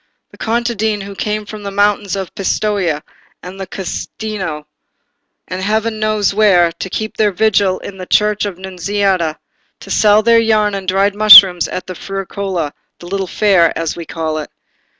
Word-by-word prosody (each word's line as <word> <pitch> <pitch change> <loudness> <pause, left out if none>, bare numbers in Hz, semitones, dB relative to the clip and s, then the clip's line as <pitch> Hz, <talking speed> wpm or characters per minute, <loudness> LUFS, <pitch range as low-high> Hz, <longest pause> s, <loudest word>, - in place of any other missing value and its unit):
"The - - -17
contadine 220 -2 -1
who 200 +1 -8
came 210 +1 -3
from 215 0 -9
the 200 - -5
mountains 205 0 0
of 190 -2 -5
Pistoia, 190 -5 -1 0.4
and 185 +2 -9
the 190 - -6
Casentino, 190 -3 -5 0.8
and 185 0 -5
heaven 220 +2 -1
knows 215 -2 0
where, 190 -5 +4
to 190 - -7
keep 220 +3 -4
their 210 -1 +2
vigil 195 -1 +1
in 190 -1 -10
the 185 - -7
church 210 0 +1
of 200 -3 -4
the 185 - -17
Nunziata, 190 -3 -1 0.4
and - - -6
sell 210 0 +4
their 230 +1 +5
yarn 215 -2 +2
and 195 -1 -5
dried 195 +2 +2
mushrooms 195 -4 +8
at 185 - -6
the 185 - -7
Fierucola 195 -4 -4 0.2
(the - - -13
little 190 +1 -3
Fair), 185 -5 +2
as 165 -1 -3
we 170 -2 -8
call 160 -1 -3
it. 150 - -7
195 Hz, 170 wpm, -15 LUFS, 185-210 Hz, 0.8 s, mushrooms